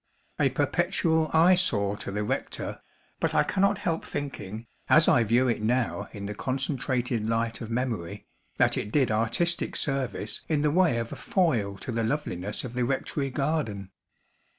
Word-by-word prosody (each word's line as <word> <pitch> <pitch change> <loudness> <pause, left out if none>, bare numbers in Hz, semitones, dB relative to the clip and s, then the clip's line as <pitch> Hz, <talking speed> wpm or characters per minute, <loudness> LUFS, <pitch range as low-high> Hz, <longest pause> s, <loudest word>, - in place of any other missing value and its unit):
A - - +4
perpetual 160 -2 +1
eyesore 160 - +4
to - - -6
the 105 +1 -2
rector; - - -3 0.4
but - - 0
I - - +5
cannot 200 +1 +2
help 170 -5 -2
thinking, 115 -6 -5 0.2
as - - +6
I 120 - +5
view 120 +4 +3
it 115 -3 0
now 120 +2 0
in 100 -1 -7
the 105 - -4
concentrated 130 -1 -1
light 115 0 -1
of 115 - -6
memory, 110 -6 -3 0.3
that - - +3
it 105 - -3
did 130 -4 +2
artistic 115 +11 0
service 130 -7 -1
in 150 -2 +1
the 150 - +3
way 175 -6 +3
of 115 0 -3
a - - -5
foil 120 - 0
to 125 - -6
the 115 0 -1
loveliness 105 -7 -2
of 125 - -6
the 125 0 0
rectory 135 +2 -1
garden. 135 -9 -2
125 Hz, 165 wpm, -27 LUFS, 110-150 Hz, 0.4 s, as